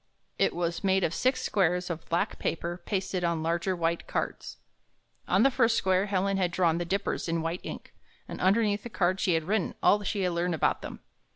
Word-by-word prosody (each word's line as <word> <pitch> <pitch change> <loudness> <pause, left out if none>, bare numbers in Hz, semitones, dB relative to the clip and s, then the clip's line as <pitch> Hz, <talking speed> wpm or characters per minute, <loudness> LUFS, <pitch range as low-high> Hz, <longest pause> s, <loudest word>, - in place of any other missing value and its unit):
It - - +2
was 170 +1 -2
made 190 -1 +2
of 160 - 0
six 255 +7 +1
squares 180 -2 +1
of 165 -1 -7
black 170 - -1
paper 170 +2 -3
pasted 190 -2 -1
on 170 -2 0
larger 170 +3 0
white 170 0 -1
cards. - - -3 0.7
On - - +3
the 270 - +5
first 230 -2 +3
square 190 +1 +2
Helen 195 0 0
had 185 -2 +1
drawn 170 -2 +1
the 175 - -2
Dippers 195 -1 -2
in 165 -1 0
white 165 +2 -3
ink, - - -8 0.3
and - - -7
underneath 205 +2 +3
on - - -26
the - - -5
card 185 -3 0
she 180 -3 +2
had 160 - 0
written 195 +2 -1
all 205 - +5
she 205 0 -2
had 180 -1 +1
learned 170 0 0
about 155 - +1
them. - - -8
180 Hz, 210 wpm, -28 LUFS, 170-195 Hz, 0.7 s, the